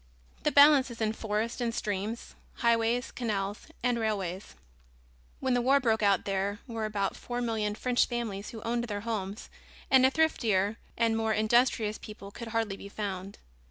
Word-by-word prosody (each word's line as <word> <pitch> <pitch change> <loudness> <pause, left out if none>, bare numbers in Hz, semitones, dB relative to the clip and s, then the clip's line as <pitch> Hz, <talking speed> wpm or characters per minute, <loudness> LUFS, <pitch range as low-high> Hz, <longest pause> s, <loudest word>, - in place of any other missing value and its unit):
The 300 - +1
balance 285 -2 +7
is 235 - -9
in 220 -1 +1
forests 220 +2 -2
and 235 -1 -1
streams, 210 +2 -3 0.2
highways, 235 +1 +1
canals, 205 -4 -3 0.2
and 245 -1 +1
railways. 195 -4 -3 0.8
When 260 - 0
the 245 - +2
war 270 +3 +4
broke 225 -4 +1
out 200 -2 +3
there 195 +1 -1
were 230 -3 -3
about 205 -2 -1
four 245 0 -5
million 220 -3 -1
French 250 +2 +2
families 220 -4 -4
who 225 -2 -8
owned 235 +1 -1
their 205 -3 -4
homes 210 -2 -4 0.4
and 265 -1 +7
a 260 - +7
thriftier 225 -9 +1 0.2
and 230 -1 +2
more 225 -1 +1
industrious 220 0 +2
people 205 -2 -10
could 235 +3 -8
hardly 225 -3 -1
be 200 - -9
found. 200 -1 -5
225 Hz, 165 wpm, -29 LUFS, 205-240 Hz, 0.8 s, balance